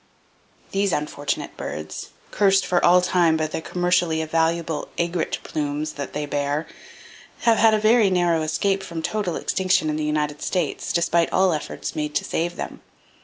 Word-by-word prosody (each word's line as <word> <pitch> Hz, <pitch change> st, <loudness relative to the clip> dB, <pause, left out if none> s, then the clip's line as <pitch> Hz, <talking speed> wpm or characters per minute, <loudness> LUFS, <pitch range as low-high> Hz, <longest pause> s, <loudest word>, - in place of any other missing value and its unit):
—These 195 Hz, -1 st, +1 dB
unfortunate 145 Hz, -1 st, -3 dB
birds, 75 Hz, +1 st, -6 dB, 0.2 s
cursed 195 Hz, -1 st, +3 dB
for 175 Hz, -, +1 dB
all 180 Hz, +1 st, +6 dB
time 175 Hz, -3 st, +3 dB
by 155 Hz, -, 0 dB
the 155 Hz, -, -4 dB
commercially 175 Hz, -2 st, +1 dB
valuable 165 Hz, -1 st, 0 dB
"aigrette" 170 Hz, 0 st, -1 dB
plumes 150 Hz, 0 st, -3 dB
that 140 Hz, -1 st, -6 dB
they 150 Hz, 0 st, -2 dB
bear, 145 Hz, +1 st, -1 dB, 0.8 s
have 230 Hz, -2 st, +3 dB
had 220 Hz, -1 st, +6 dB
a -, -, +1 dB
very 215 Hz, -1 st, +4 dB
narrow 175 Hz, -3 st, +2 dB
escape 190 Hz, +5 st, 0 dB
from 170 Hz, -4 st, -6 dB
total 205 Hz, -4 st, -1 dB
extinction 185 Hz, -4 st, +1 dB
in 150 Hz, -, -2 dB
the 155 Hz, -, -2 dB
United 150 Hz, -1 st, -1 dB
States, 175 Hz, -6 st, -2 dB
despite 170 Hz, 0 st, +2 dB
all 190 Hz, -1 st, +3 dB
the -, -, +1 dB
efforts 150 Hz, -, -5 dB
made 150 Hz, -1 st, -3 dB
to -, -, +1 dB
save 175 Hz, +1 st, -2 dB
them. -, -, -6 dB
170 Hz, 170 wpm, -23 LUFS, 155-185 Hz, 0.8 s, all